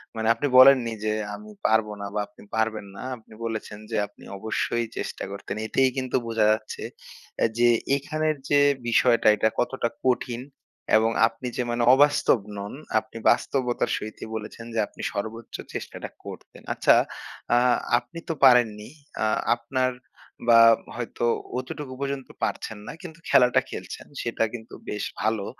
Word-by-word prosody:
মানে 110 0 -1
আপনি 120 +5 -2
বলেননি 130 -3 +8
যে 105 - +1 0.2
আমি 105 +1 -11
পারব 110 -1 +3
না 100 - -4
বা 105 - -1
আপনি 105 - -18
পারবেন 110 -1 0
না। - - -8 0.2
আপনি 110 -1 -18
বলেছেন 110 -2 -5
যে - - 0
আপনি 105 - -20
অবশ্যই 115 +2 -1
চেষ্টা - - -4
করতেন। 100 0 -6
এতেই 130 +4 +3
কিন্তু 130 -1 -2
বোঝা 115 -2 +2
যাচ্ছে 110 0 -3 0.6
অ্যা - - +4
যে 120 0 +5 0.3
এখানের 155 +2 -1
যে 145 - +5 0.3
বিষয়টা 115 0 +4
এটা 110 +1 +2
কতটা 125 -1 0 0.2
কঠিন। 125 -1 0 0.6
এবং 110 +1 +2 0.2
আপনি 115 +2 -7
যে 125 - +1
মানে 120 0 0
অবাস্তব 145 -2 +4 0.2
নন, 100 +1 -6 0.3
আপনি 115 - -12
বাস্তবতার 125 -3 +1
সহিতই 110 +1 -7
বলেছেন 110 +1 -7
যে 115 - 0
আপনি - - -12
সর্বোচ্চ 110 +2 -5 0.2
চেষ্টাটা - - -6 0.2
করতেন। - - -10
আচ্ছা, - - +5 0.6
আ - - +5 0.4
আপনি 120 +7 -11
তো 165 - +1
পারেননি। 115 -5 +4 0.3
আ - - +3 0.3
আপনার 130 +2 -1 0.6
বা 115 0 +8 0.4
হয়তো 120 0 -3 0.3
অতটুকু 130 +1 -5
পর্যন্ত 140 -1 -3 0.2
পারছেন 110 - -2
না, - - -5
কিন্তু 165 -2 -10
খেলাটা 125 -1 +5
খেলছেন। - - -8
সেটা 115 -1 -1
কিন্তু 115 -2 -9 0.2
বেশ 105 - -3 0.2
ভালো। 110 -2 0
115 Hz, 150 wpm, -25 LUFS, 110-130 Hz, 0.6 s, বলেননি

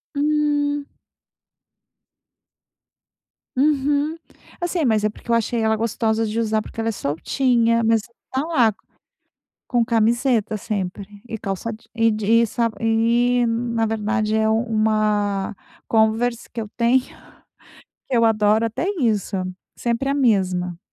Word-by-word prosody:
Hum. 290 -1 +1 2.7
Uhum. 290 +2 +1 0.4
Assim, 345 -2 -1
mas 220 -3 +2
é - - +4
porque 235 - -12
eu - - +4
achei 230 0 0
ela 220 0 +2
gostosa 225 0 0
de 215 +2 -3
usar, 220 -1 +1
porque 225 - -8
ela 225 - -1
é - - 0
soltinha. 230 - +1
Mas 225 -1 +3
e - - -18 0.2
tá 265 +3 -1
lá 245 -10 +3 1.0
com 240 -2 +2
camiseta 230 -1 +1
sempre 200 -1 -5
e 225 - -5
calça 200 +2 -4
je 220 0 -11
e 225 0 +3
de 215 -1 -3 0.2
e - - +2
sa 230 +1 0
e, 235 +2 +2
na 230 -1 0
verdade 215 0 -1
é 220 0 +2
um 220 +1 +2
uma 215 -3 0 0.3
Converse 225 +2 +1
que 235 - -4
eu 215 - -5
tenho, 245 +2 +3 1.1
que 255 - 0
eu 230 - +4
adoro. 215 0 +3
Até 230 - -3
isso, 210 -4 0 0.4
sempre 240 +3 -1
a 280 - +1
mesma. 185 -9 +1
225 Hz, 140 wpm, -22 LUFS, 215-245 Hz, 2.7 s, é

